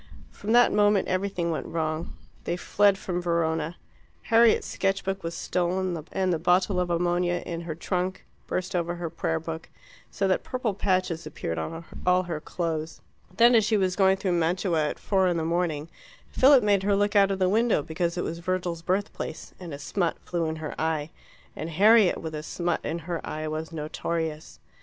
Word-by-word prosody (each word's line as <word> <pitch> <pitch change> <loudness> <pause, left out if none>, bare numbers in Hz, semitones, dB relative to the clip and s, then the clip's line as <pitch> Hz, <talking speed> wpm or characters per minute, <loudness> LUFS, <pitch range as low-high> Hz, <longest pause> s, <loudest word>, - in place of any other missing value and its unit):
From 210 - -5
that 245 0 +6
moment 205 -1 +3
everything 185 -2 -1
went 160 - -3
wrong. 160 0 -3 0.3
They 175 - -1
fled 200 +2 +3
from 180 -2 -3
Verona. 165 -1 -1 0.5
Harriet's 230 0 +4
sketch 195 0 -1
book 195 0 -2
was 165 0 -4
stolen, 180 -1 -1
and 185 -2 +1
the 165 - -1
bottle 185 +2 +2
of 180 -1 0
ammonia 175 +1 0
in 170 -1 -4
her 165 -2 -5
trunk 180 +2 -2 0.2
burst 185 0 -3
over 175 0 -1
her 170 -2 -5
prayer 165 -1 -1
book, 165 0 -7 0.4
so 195 - -1
that 185 - +2
purple 250 -5 -2
patches 185 -4 0
appeared 80 0 -4
on 165 - -5 0.2
all 180 0 +3
her 170 -4 -4
clothes. 160 -1 -4 0.4
Then, 235 +2 +7
as 225 -2 +5
she 215 +1 +2
was 185 -2 +1
going 190 -1 +4
through 190 -1 -1
Mantua 170 -1 +1
at - - -4
four 190 -2 +1
in 175 -1 +1
the 160 - -1
morning, 165 -3 -1 0.4
Philip 270 -1 +6
made 205 -2 +3
her 200 +1 +2
look 205 +1 +1
out 200 -1 +6
of 195 - -1
the 185 -1 +2
window 220 -4 +2
because 170 +3 -2
it 175 - -1
was 170 - -4
Virgil's 175 -1 -2
birthplace, 185 -2 -3
and 175 -3 -8
a 140 - -5
smut 170 +4 -1
flew 170 -2 -1
in 160 - -2
her 155 -1 -5
eye, 160 -1 -1 0.4
and 160 - -5
Harriet 205 +3 +5
with 160 -1 -6
a 150 - -4
smut 170 +2 -2
in 160 - -2
her 170 -2 -3
eye 155 0 -4
was 155 +1 -4
notorious. 160 0 -4
175 Hz, 190 wpm, -26 LUFS, 165-195 Hz, 0.5 s, Then